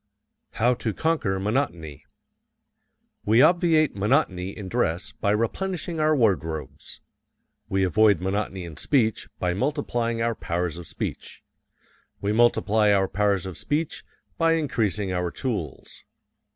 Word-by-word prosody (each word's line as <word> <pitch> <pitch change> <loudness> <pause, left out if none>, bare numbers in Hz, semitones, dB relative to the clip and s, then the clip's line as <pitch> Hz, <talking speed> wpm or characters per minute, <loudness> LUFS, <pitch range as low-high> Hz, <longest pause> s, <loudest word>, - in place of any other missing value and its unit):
How 120 +3 +2
to 115 -3 -3
Conquer 150 -13 0
Monotony 95 - -2 1.2
We 115 +5 +5
obviate 165 -2 +3
monotony 100 -4 +1
in 100 -1 -8
dress 85 0 -1
by 110 -2 -2
replenishing 165 - -1
our 155 0 +3
wardrobes. 80 - -1 0.7
We 95 0 +1
avoid 100 0 +4
monotony 95 0 -2
in 80 -3 -10
speech 115 -7 +1
by 90 -1 0
multiplying 120 - -1
our 115 0 +1
powers 85 -4 -3
of 85 - -9
speech. - - -6 0.8
We 100 - -1
multiply 110 -2 +3
our 95 -1 +3
powers 100 0 0
of 95 -2 -7
speech 150 +2 -2 0.4
by 165 0 +4
increasing 110 - 0
our 90 -1 -1
tools. 95 - -5
105 Hz, 125 wpm, -25 LUFS, 95-130 Hz, 1.2 s, We